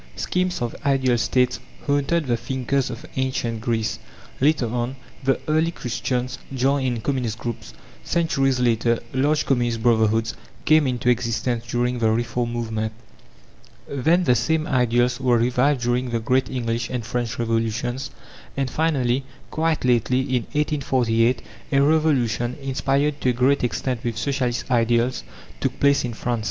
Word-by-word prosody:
Schemes 180 -4 -1
of 120 - -3
ideal 135 -3 +2
States 125 +2 +1 0.3
haunted 145 +3 +1
the 120 -2 +1
thinkers 130 +2 -1
of 125 +4 -7
Ancient 120 -4 -1
Greece; 115 -2 -1 0.4
later 145 -1 +3
on, 120 +3 -2 0.3
the 135 0 +2
early 155 +2 +2
Christians 125 -3 -3
joined 135 +1 +1
in 120 -3 -2
communist 125 -4 -1
groups; 115 - -6 0.3
centuries 135 -6 +1
later, 115 -1 +2 0.2
large 145 +3 +2
communist 120 -4 0
brotherhoods 110 -1 +2 0.3
came 155 -2 +5
into 125 -1 -2
existence 120 -1 0
during 120 +1 0
the 110 -1 +3
Reform 120 +1 -1
movement. 110 -2 -2 0.9
Then, 160 +7 +2
the 125 - +4
same 160 +5 +1
ideals 125 -2 +2
were 125 -2 +3
revived 125 +3 +2
during 125 +1 0
the 115 -1 -1
great 130 +3 +1
English 115 -2 -2
and 125 -3 -3
French 120 -1 -2
Revolutions; 120 +3 -1 0.5
and 135 -2 -1
finally, 135 -5 +1 0.3
quite 160 -3 0
lately, 125 +1 +2
in 130 -3 -1
1848, 130 -5 +1 0.3
a 135 - +5
revolution, 140 -6 +2
inspired 140 +2 0
to 130 - +2
a - - +2
great 130 +3 +2
extent 125 0 -2
with 115 -2 -2
Socialist 130 -1 -1
ideals, 120 - +2 0.4
took - - -2
place 140 0 +4
in 120 -2 -4
France. 120 0 -2
125 Hz, 145 wpm, -23 LUFS, 120-135 Hz, 0.9 s, came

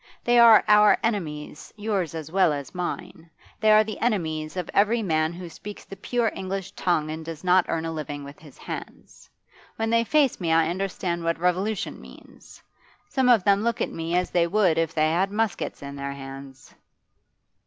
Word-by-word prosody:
They 240 0 +4
are 230 -2 +8
our 210 0 +6
enemies, 155 -10 -4
yours 200 -6 -2
as 160 -1 -7
well 185 -3 +3
as 140 -2 -6
mine; 175 -2 -5 0.3
they 215 0 +4
are 215 0 +7
the 215 0 -7
enemies 160 -8 -2
of 180 -2 -3
every 220 +3 +2
man 155 -3 +1
who 175 +1 -8
speaks 205 +5 -10
the 195 - -9
pure 235 +3 -1
English 195 0 -5
tongue 155 -6 -1
and 160 +1 -6
does 165 0 -8
not 180 0 +4
earn 165 0 -1
a 165 - -3
living 145 -2 -5
with 140 +1 -11
his 150 -4 -16
hands. - - -9 0.5
When 225 0 -2
they 230 0 +3
face 280 -3 +2
me 165 -2 0
I 160 0 +3
understand 180 -1 -3
what 165 0 0
revolution 180 +4 -1
means; - - -16 0.5
some 265 -2 +1
of 230 -6 +5
them 200 +1 +3
look 230 +1 -1
at - - -1
me 165 +1 -3
as 180 0 0
they 170 -1 +2
would 180 -3 +2
if 165 -1 0
they 155 0 +2
had 190 +4 +1
muskets 215 -7 -2
in 140 0 -7
their 140 0 -5
hands. 135 -1 -11
180 Hz, 190 wpm, -25 LUFS, 160-210 Hz, 0.5 s, are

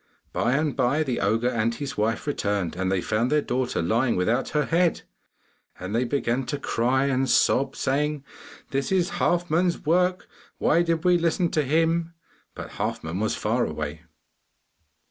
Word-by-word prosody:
By 120 - +1
and 150 0 0
by 140 +4 +2
the 130 -5 -2
ogre 110 +5 +1
and 115 -1 0
his 140 +2 -5
wife 110 +2 -1
returned 100 - -1
and 95 0 -1
found 115 +5 0
their 150 - +4
daughter 125 -7 -1
lying 115 +8 +1
without 110 +8 0
her 150 -1 0
head, 170 +2 +1 0.8
and 95 +3 -5
they 120 +3 +1
began 130 -1 -1
to 145 - -2
cry 130 0 0
and 135 -1 0
sob, 135 +1 +3
saying, 145 +1 -1 0.5
'This 135 +4 -1
is 185 -1 +2
Halfman's 175 0 +1
work, 180 +3 +1 0.3
why 165 - +3
did 165 -1 0
we 180 -1 +4
listen 170 +1 +1
to 155 - +2
him?' 165 +3 +1 0.4
But - - -8
Halfman 80 +4 -3
was 110 +1 0
far - - 0
away. 75 +1 -4
135 Hz, 160 wpm, -25 LUFS, 115-160 Hz, 0.8 s, their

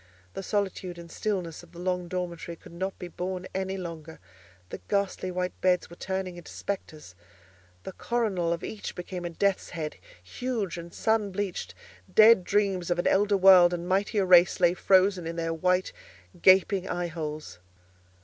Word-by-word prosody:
The - - -5
solitude 190 -3 -2
and 170 -1 -11
the - - -11
stillness 185 -6 -3
of 175 0 -18
the 170 - -11
long 180 -1 -2
dormitory 175 -2 -4
could - - -16
not 190 +3 -4
be 180 - -7
borne 180 +2 -5
any 190 0 -2
longer; 165 -3 -8 0.5
the - - -7
ghastly 200 -2 -1
white 180 0 -2
beds 180 -2 +1
were - - -10
turning 190 -1 -4
into 175 - -11
spectres—the 90 - -9
coronal 195 -6 -1
of 170 0 -2
each 215 - -6
became 180 0 -6
a - - -2
death's 195 +3 0
head, 155 -3 -5 0.3
huge 205 - -3
and 170 0 -9
sun 220 0 0
bleached—dead 185 - +2
dreams 195 -3 0
of 175 - +1
an 175 - -1
elder 205 +1 +3
world 185 -2 +7
and 175 0 -6
mightier 195 +2 +1
race 180 -1 +6
lay 175 -1 +4
frozen 185 -1 +3
in 165 - -4
their 165 -1 -2
wide 180 +3 +1 0.5
gaping 190 0 +5
eyeholes. 155 - -4
180 Hz, 160 wpm, -27 LUFS, 170-190 Hz, 0.5 s, world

